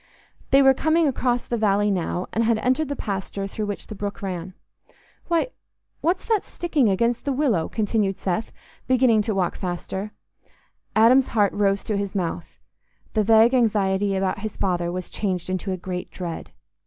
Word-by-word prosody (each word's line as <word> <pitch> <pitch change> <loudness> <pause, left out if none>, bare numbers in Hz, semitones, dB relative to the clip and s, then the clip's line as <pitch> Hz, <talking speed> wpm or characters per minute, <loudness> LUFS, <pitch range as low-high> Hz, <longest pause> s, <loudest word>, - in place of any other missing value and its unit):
They 275 +1 +6
were 270 0 +7
coming 315 +4 +2
across 245 -2 0
the 235 - -2
valley 205 -1 +2
now, 180 -1 -1
and 230 - +1
had 230 0 +2
entered 260 +6 0
the 285 - -2
pasture 195 -3 -4
through 210 +2 -4
which 205 - -5
the - - -8
brook 205 0 -5
ran. 185 -1 -5 0.7
"Why, 340 +6 +1 0.5
what's 355 +3 0
that 440 -4 +2
sticking 305 -9 0
against 235 +5 +1
the 280 - -1
willow?" 255 - +1
continued 210 -3 0
Seth, 185 +3 -2 0.4
beginning 250 -4 +4
to 215 -1 -2
walk 185 -3 0
faster. 190 +3 -4 0.8
Adam's 245 +4 +6
heart 205 -2 +4
rose 200 -1 +1
to 210 - -1
his 200 0 -3
mouth: 175 -2 -3 0.6
the 215 - +2
vague 225 +3 +5
anxiety 205 -5 +2
about 190 0 -1
his 215 +1 -6
father 175 -2 0
was 180 0 -4
changed 185 -3 -3
into 185 +1 -2
a 185 - -2
great 180 0 -5
dread. 175 -3 -6
205 Hz, 170 wpm, -23 LUFS, 190-240 Hz, 0.8 s, were